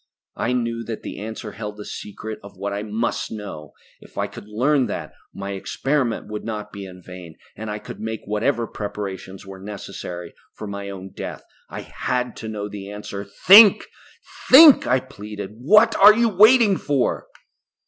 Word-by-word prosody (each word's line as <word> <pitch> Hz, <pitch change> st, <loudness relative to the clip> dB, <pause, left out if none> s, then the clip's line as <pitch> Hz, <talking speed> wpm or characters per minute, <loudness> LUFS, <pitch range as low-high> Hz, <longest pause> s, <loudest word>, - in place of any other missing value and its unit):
I 120 Hz, +3 st, -1 dB
knew 115 Hz, -1 st, -2 dB
that 115 Hz, -2 st, -6 dB
the -, -, -7 dB
answer 110 Hz, 0 st, -7 dB
held 105 Hz, -1 st, -7 dB
the 105 Hz, -, -8 dB
secret 110 Hz, +1 st, -7 dB
of 100 Hz, -1 st, -14 dB
what 100 Hz, +1 st, -4 dB
I 100 Hz, -, -3 dB
must 110 Hz, +2 st, -3 dB
know. 100 Hz, -9 st, -8 dB, 0.3 s
If -, -, -18 dB
I -, -, 0 dB
could -, -, -11 dB
learn 130 Hz, +5 st, +1 dB
that, -, -, -6 dB, 0.2 s
my 100 Hz, 0 st, -6 dB
experiment 125 Hz, +5 st, -2 dB
would 105 Hz, 0 st, -6 dB
not 105 Hz, -2 st, -6 dB
be 100 Hz, -1 st, -7 dB
in 90 Hz, -1 st, -13 dB
vain, 90 Hz, -3 st, -11 dB, 0.2 s
and 110 Hz, +1 st, -7 dB
I 105 Hz, -, -3 dB
could -, -, -10 dB
make 110 Hz, 0 st, -5 dB
whatever 105 Hz, +3 st, 0 dB
preparations 100 Hz, -3 st, -7 dB
were 95 Hz, 0 st, -10 dB
necessary 90 Hz, -3 st, -8 dB, 0.2 s
for -, -, -8 dB
my 100 Hz, -1 st, -6 dB
own 95 Hz, -1 st, -9 dB
death. -, -, -7 dB, 0.3 s
I -, -, -7 dB
had 125 Hz, -1 st, -3 dB
to 110 Hz, -, -7 dB
know 105 Hz, -2 st, -5 dB
that 105 Hz, -, -8 dB
answer. 105 Hz, -1 st, -7 dB
"Think! 195 Hz, -, +7 dB, 0.6 s
Think!" 295 Hz, +2 st, +9 dB
I 125 Hz, +2 st, +3 dB
pleaded. 105 Hz, -5 st, -9 dB
"What 215 Hz, -, +5 dB
are 210 Hz, +2 st, +8 dB
you 235 Hz, 0 st, +3 dB
waiting 215 Hz, 0 st, +5 dB
for?" 140 Hz, -4 st, -1 dB
105 Hz, 175 wpm, -22 LUFS, 100-125 Hz, 0.6 s, Think